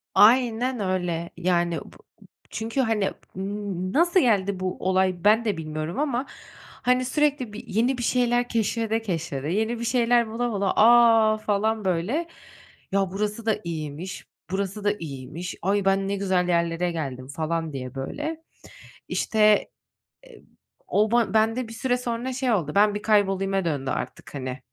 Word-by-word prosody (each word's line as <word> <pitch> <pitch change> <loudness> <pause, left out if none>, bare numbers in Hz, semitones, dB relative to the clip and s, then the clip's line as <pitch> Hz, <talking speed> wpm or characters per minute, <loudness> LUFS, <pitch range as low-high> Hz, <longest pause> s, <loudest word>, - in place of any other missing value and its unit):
Aynen 245 +2 +4
öyle. 180 -3 -2
Yani 175 -1 +1
b - - -14 0.5
çünkü 230 +4 -2
hani, 220 -5 +1 0.2
m 195 -1 -4
nasıl 345 +4 +4
geldi 200 - +2
bu 185 -1 -3
olay 185 -1 +1
ben 220 +3 +4
de 205 -5 0
bilmiyorum 155 - -4
ama 270 -3 0 0.3
hani 250 0 -1
sürekli 280 -5 0
bir 215 - -9
yeni 240 +6 +1
bir 240 - -3
şeyler 245 0 +1
keşfede 225 0 0
keşfede, 165 -9 -3
yeni 220 +5 0
bir 235 - -3
şeyler 240 -1 +3
bula 235 +2 -2
bula, 200 -2 0
a 225 -1 +6
falan 215 0 0
böyle, 195 - 0 0.6
ya 195 -1 +1
burası 210 +3 -3
da 220 - +1
iyiymiş, 165 +1 -6 0.2
burası 200 +1 -3
da 205 0 +2
iyiymiş, 155 +3 -6
ay 200 +1 +1
ben 195 0 +2
ne 200 - -1
güzel 190 -2 0
yerlere 170 0 +1
geldim, 135 -6 -5
falan 160 +2 -3
diye 130 -1 -6
böyle. 300 - -4 0.7
İşte, 215 -1 +3 0.6
eee, 480 -3 -16 0.4
o 215 +1 +2
ban 235 -2 +2
bende 225 +3 +2
bir 225 - -9
süre 245 +2 0
sonra 245 +1 -3
şey 255 -1 0
oldu, 165 -8 0
ben 205 +1 +4
bir 210 - -3
kaybolayıma 195 -3 +2
döndü 140 -4 -2
artık 125 +3 -5
hani, 130 -1 -5
205 Hz, 155 wpm, -25 LUFS, 175-235 Hz, 0.7 s, a